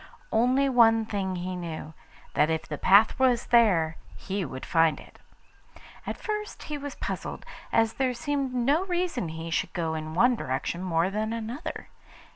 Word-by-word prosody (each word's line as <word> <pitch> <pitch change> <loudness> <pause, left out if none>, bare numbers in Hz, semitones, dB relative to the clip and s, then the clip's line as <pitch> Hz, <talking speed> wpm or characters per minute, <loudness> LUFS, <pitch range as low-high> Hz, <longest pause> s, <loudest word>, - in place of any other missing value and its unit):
Only 250 +5 +3
one 225 -3 +5
thing 195 -3 -2
he 180 +1 -4
knew, 160 -3 -6 0.4
that 150 - +3
if 160 -1 -2
the 150 - -5
path 205 +6 +5
was 250 -2 +3
there, 180 -10 +3 0.2
he 195 0 -3
would 130 -4 -6
find 165 -3 +3
it. - - -16 0.9
At - - -3
first 425 -1 -4
he 300 - -4
was 285 0 -6
puzzled, - - -5 0.3
as 225 0 +3
there 255 -2 0
seemed 280 0 -2
no 270 +7 +2
reason 350 - -1
he 160 +1 -6
should 165 - -1
go 165 -3 -1
in 155 0 -5
one 245 +7 +4
direction 135 - -3
more 180 0 +1
than 215 +2 -2
another. 230 +7 -5
220 Hz, 165 wpm, -27 LUFS, 165-255 Hz, 0.9 s, one